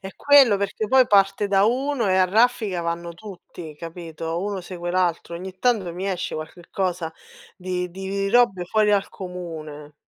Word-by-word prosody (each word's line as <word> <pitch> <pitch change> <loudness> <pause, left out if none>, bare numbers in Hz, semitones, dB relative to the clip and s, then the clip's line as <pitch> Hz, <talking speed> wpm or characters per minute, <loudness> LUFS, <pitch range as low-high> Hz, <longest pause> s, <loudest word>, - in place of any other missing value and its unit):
È 195 0 -9
quello, 275 -7 +6
perché 200 +2 -2
poi 260 +2 +5
parte 195 0 +3
da 195 0 +4
uno 255 0 0
e 185 - +3
a 185 - +5
raffica 215 -2 +2
vanno 170 0 -3
tutti, 180 -5 -11
capito? 165 0 -6
Uno 200 -2 -3
segue 175 -1 -6
l'altro. 175 -2 0
Ogni 185 +2 -8
tanto 205 -7 +1
mi 185 +2 -4
esce 185 -2 -3
qualche 160 +2 -8
cosa 180 -4 -2 0.4
di 180 -1 -3
di 195 +2 -3
robe 235 -6 +3
fuori 210 +3 +2
dal 200 -1 +2
comune. 160 -5 -8
185 Hz, 165 wpm, -23 LUFS, 170-205 Hz, 0.4 s, quello